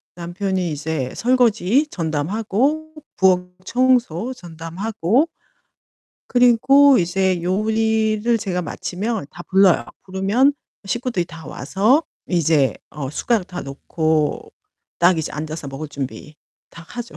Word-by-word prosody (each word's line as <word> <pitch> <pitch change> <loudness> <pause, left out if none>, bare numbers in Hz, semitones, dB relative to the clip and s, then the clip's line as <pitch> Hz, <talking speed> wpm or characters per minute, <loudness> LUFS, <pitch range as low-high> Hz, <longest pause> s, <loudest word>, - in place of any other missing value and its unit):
남편이 180 +1 -2
이제 150 -3 -3
설거지 245 - +2
전담하고 215 - -1 0.2
부엌 180 -1 +3 0.2
청소 250 -3 +1
전담하고 180 - -1 1.0
그리고 255 +3 +5
이제 185 0 +1
요리를 220 +3 +1
제가 185 -4 -2
마치면 200 +2 -4
다 175 - -10
불러요. 190 -2 +4 0.2
부르면 195 +9 +2 0.3
식구들이 240 -3 -1
다 165 -2 -11
와서 205 - +1 0.3
이제 160 -6 +2 0.2
어 140 -4 -5
숟가락 210 +5 0
다 180 -1 -6
놓고 155 +2 -1 0.5
딱 175 0 +4
이제 160 - -3
앉아서 155 -1 -5
먹을 140 +3 -6
준비 145 +1 -7 0.4
다 170 - -12
하죠. 240 -1 -7
190 Hz, 240 characters per minute, -21 LUFS, 165-230 Hz, 1.0 s, 그리고